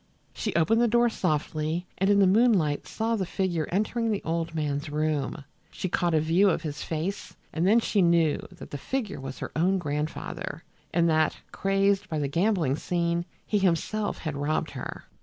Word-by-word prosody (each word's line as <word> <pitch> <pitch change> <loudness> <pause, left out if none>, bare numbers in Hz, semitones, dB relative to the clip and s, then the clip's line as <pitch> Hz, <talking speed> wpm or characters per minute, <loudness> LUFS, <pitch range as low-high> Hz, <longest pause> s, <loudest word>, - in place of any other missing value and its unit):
She 210 - -3
opened 215 +8 +3
the 240 - +4
door 240 +1 +4
softly, 155 -1 -1
and 195 +1 +2
in 205 - +5
the 200 - +6
moonlight 190 -7 +3
saw 225 +1 -1
the 200 - -1
figure 175 -6 -1
entering 220 +4 0
the 210 -2 -1
old 165 0 -2
man's 145 -1 -2
room. 150 -1 -1 0.3
She 185 - -4
caught 175 -1 +1
a - - +5
view 170 +6 +4
of 175 - 0
his 150 -2 -4
face 170 +6 -4 0.2
and 165 +3 +1
then 220 +4 +6
she 210 -3 +1
knew 170 -3 +3
that - - -11
the 145 - -5
figure 240 - -3
was 135 0 -6
her - - -5
own 185 +4 +3
grandfather, 150 -2 -4 0.3
and 170 0 +3
that, 155 -1 +2
crazed 195 0 +1
by 155 - -2
the 145 -2 0
gambling 165 -3 +1
scene, 170 0 -1 0.2
he 210 - +1
himself 195 +3 0
had 155 -3 -4
robbed 145 +2 -1
her! - - -6
170 Hz, 185 wpm, -27 LUFS, 155-200 Hz, 0.3 s, the